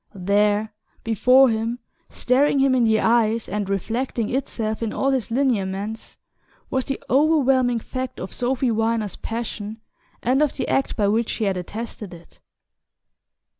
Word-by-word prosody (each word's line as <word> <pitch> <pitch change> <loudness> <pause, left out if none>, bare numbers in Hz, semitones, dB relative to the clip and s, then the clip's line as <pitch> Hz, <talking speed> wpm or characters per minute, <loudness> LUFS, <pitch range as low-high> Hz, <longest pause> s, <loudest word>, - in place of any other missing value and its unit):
There 205 +3 +1 0.3
before 250 +4 +5
him, 225 +1 -1 0.3
staring 275 +3 +2
him 270 -1 +3
in 250 -2 +3
the 220 -1 +3
eyes, 225 0 +2
and 205 -1 -3
reflecting 230 +4 -2
itself 225 -5 -2
in 225 -2 -2
all 275 - +1
his 260 -4 -1
lineaments, 220 -4 -2 0.5
was 260 -1 0
the 275 - -3
overwhelming 270 -4 +3
fact 255 +2 -5
of 185 - -6
Sophy 250 0 0
Viner's 225 -2 -1
passion 225 -1 -5 0.4
and 260 +4 +2
of 300 -2 +2
the - - -2
act 270 - 0
by 205 -3 +2
which 225 +3 +1
she 225 - -2
had 195 -2 +1
attested 205 0 -6
it. 170 0 -18
230 Hz, 145 wpm, -22 LUFS, 210-255 Hz, 0.5 s, before